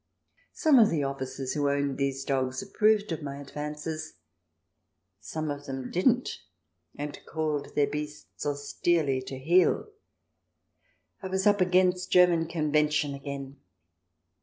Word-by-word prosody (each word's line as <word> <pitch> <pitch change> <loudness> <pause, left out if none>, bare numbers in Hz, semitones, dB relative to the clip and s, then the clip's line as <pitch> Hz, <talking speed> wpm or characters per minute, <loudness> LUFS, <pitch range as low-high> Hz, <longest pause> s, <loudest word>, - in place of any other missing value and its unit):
Some 300 -6 +5
of 220 - +6
the 150 -3 0
officers 135 -1 -4
who 145 -2 +1
owned 140 -1 -1
these 135 0 -1
dogs 130 0 -1
approved 210 0 +2
of 165 - -3
my 140 -1 -6
advances; 150 +2 -5 1.0
some 155 +7 -4
of 145 0 -7
them 135 -1 -5
didn't, 245 +8 +1 0.6
and 145 0 -5
called 155 -3 -2
their 145 - +4
beasts 150 +1 -6
austerely 145 0 0
to 130 +1 -7
heel. 175 - +2 1.3
I 190 - -4
was 190 +1 -1
up 205 -1 +4
against 185 0 +2
German 175 -2 +5
convention 150 -2 +1
again 140 0 -7
150 Hz, 125 wpm, -28 LUFS, 140-180 Hz, 1.3 s, of